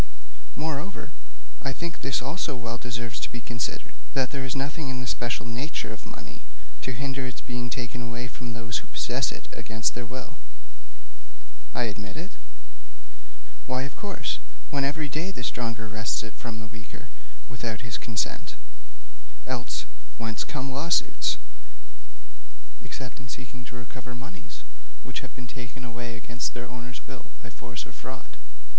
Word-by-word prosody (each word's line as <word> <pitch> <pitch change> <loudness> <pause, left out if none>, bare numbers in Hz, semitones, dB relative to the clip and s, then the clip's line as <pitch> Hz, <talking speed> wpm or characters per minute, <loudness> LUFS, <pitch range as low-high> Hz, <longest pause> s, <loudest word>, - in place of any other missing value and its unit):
Moreover, 160 +5 +1 0.5
I 135 - +3
think 170 +4 -1
this 130 -1 +4
also 145 +1 +2
well 120 -1 0
deserves 120 -1 0
to - - +1
be 120 - -1
considered 120 0 0 0.2
that 130 -2 +6
there 140 -2 +1
is 130 0 +1
nothing 140 +2 +2
in 130 -1 +1
the 125 - 0
special 120 0 +3
nature 120 0 +1
of 110 - -7
money - - -7 0.4
to 130 - +1
hinder 135 +2 +2
its 125 - -2
being 120 -1 0
taken 120 0 0
away 120 +1 0
from 120 -1 -3
those 115 0 +2
who - - -10
possess - - +4
it - - -5
against 110 0 +3
their 120 0 -1
will.' 130 0 -3 1.4
'I 125 - +6
admit 105 +1 -1
it.' 175 +5 -2 1.4
'Why, 130 0 +4
of 140 - -2
course, 200 -2 +1 0.3
when 140 -2 +5
every 150 +2 +4
day 155 +6 +2
the 155 -11 -2
stronger 115 -2 +2
wrests 110 0 +3
it 110 - -4
from 115 -2 -3
the - - -3
weaker 110 -1 -7 0.4
without 115 -3 0
his 115 -1 0
consent. 110 -2 +2 0.9
Else, 125 -8 +1 0.3
whence 115 -1 +2
come 135 -2 0
lawsuits, 155 +6 +6 1.5
except 130 0 -3
in 130 -2 -7
seeking 125 +1 -4
to 125 - -6
recover 125 +1 -5
moneys 150 +7 -6 0.4
which - - 0
have - - -7
been 125 - -4
taken 125 +1 -4
away 120 0 -2
against 120 +1 0
their 120 0 -1
owner's 125 +1 -5
will 135 - -6 0.2
by 120 - -5
force 120 +2 -3
or - - -8
fraud?' - - -6
125 Hz, 160 wpm, -32 LUFS, 120-135 Hz, 1.5 s, that